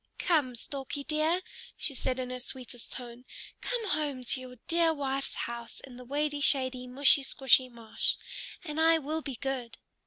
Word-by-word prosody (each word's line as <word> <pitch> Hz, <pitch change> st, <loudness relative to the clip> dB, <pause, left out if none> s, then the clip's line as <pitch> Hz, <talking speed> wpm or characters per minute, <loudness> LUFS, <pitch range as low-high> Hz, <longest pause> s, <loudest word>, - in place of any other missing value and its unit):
"Come, 290 Hz, -8 st, +2 dB
Storkie 275 Hz, +3 st, -5 dB
dear," 320 Hz, +4 st, +2 dB, 0.3 s
she 280 Hz, -, 0 dB
said 260 Hz, -1 st, -1 dB
in 255 Hz, -1 st, -3 dB
her 255 Hz, -, -3 dB
sweetest 250 Hz, -1 st, -5 dB
tone, 245 Hz, -1 st, -7 dB, 0.4 s
"come 470 Hz, -4 st, -1 dB
home 290 Hz, -6 st, 0 dB
to 255 Hz, +1 st, +1 dB
your 255 Hz, -1 st, -9 dB
dear 330 Hz, -1 st, +3 dB
wife's 275 Hz, -1 st, -1 dB
house 235 Hz, 0 st, -4 dB
in 260 Hz, -2 st, -11 dB
the 250 Hz, -, -9 dB
wady 290 Hz, +2 st, 0 dB
shady, 260 Hz, -3 st, +2 dB
mushy 275 Hz, +3 st, +5 dB
squshy 265 Hz, -1 st, +4 dB
marsh, 230 Hz, -2 st, -1 dB, 0.5 s
and 310 Hz, -2 st, -2 dB
I 325 Hz, 0 st, +7 dB
will 315 Hz, +1 st, -2 dB
be 275 Hz, -4 st, -4 dB
good." 255 Hz, -2 st, -3 dB
270 Hz, 165 wpm, -31 LUFS, 250-300 Hz, 0.5 s, I